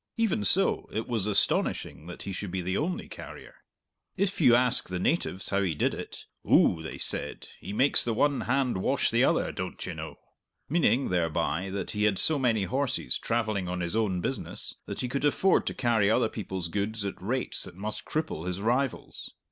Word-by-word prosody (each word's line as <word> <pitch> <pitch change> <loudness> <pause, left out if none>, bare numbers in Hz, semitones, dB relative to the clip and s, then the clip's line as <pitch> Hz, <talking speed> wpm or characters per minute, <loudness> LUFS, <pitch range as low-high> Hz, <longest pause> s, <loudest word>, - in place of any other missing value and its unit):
Even 215 - +1
so, 95 - +4
it 110 +1 -3
was 110 -5 -1
astonishing 100 -5 0
that 90 - -8
he 100 - -5
should 95 +1 -5
be 95 +1 -3
the 95 +2 -2
only 175 - -2
carrier. - - -11 0.6
If 195 -1 -1
you 125 -5 +6
asked 125 -3 +4
the 90 - -3
natives 95 - -1
how 100 0 +1
he 90 -5 -1
did - - 0
it, - - -8 0.2
"Ou," 80 - +4
they 80 - -7
said, - - -2
"he - - -7
makes 130 +7 +3
the 115 -2 -1
one 145 +3 +2
hand 130 -2 0
wash 95 - +1
the - - +3
other, - - +2
doan't - - -6
ye - - -5
know?" - - -7 0.5
meaning 140 -4 +2
thereby 85 +1 -1
that 100 +1 -4
he 105 0 0
had 105 -2 +2
so 155 +6 +6
many 115 -6 +1
horses 125 - -1
travelling 110 -5 -1
on 90 0 -3
his 85 +3 -2
own 100 -5 0
business, 95 -5 +1
that - - -5
he 125 - -2
could 135 +3 -3
afford 180 +6 +2
to - - -2
carry 115 -5 +2
other 110 0 +2
people's 95 -4 -4
goods 100 +4 -3
at 100 - -5
rates 125 +7 -1
that - - -11
must 105 +3 -5
cripple 150 - -3
his 90 +1 -2
rivals. 120 +4 -2
105 Hz, 195 wpm, -28 LUFS, 95-130 Hz, 0.6 s, you